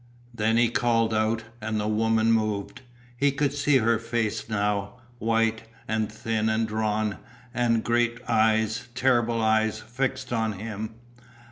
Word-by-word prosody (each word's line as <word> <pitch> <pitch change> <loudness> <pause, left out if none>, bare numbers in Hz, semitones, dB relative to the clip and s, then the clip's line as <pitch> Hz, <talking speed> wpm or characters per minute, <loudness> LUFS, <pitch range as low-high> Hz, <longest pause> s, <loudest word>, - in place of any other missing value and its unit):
Then 115 0 +1
he 120 0 +5
called 115 -2 +1
out 110 +1 +1 0.2
and 110 0 -2
the 105 - -1
woman 110 +1 +2
moved. 110 -2 -1 0.3
He 140 +3 +2
could 140 0 0
see 145 -1 +3
her 115 -2 +2
face 115 -1 -2
now, 100 -1 -1 0.3
white, 115 0 +1 0.2
and 110 -1 -1
thin 110 0 -1
and 110 +1 +1
drawn, 110 -1 -1 0.3
and 115 -2 +1
great 120 0 +1
eyes, 110 0 +2
terrible 120 -3 +2
eyes, 110 0 +2
fixed 130 +3 -3
on 110 -2 0
him. 110 +2 -6
110 Hz, 140 wpm, -26 LUFS, 110-115 Hz, 0.3 s, he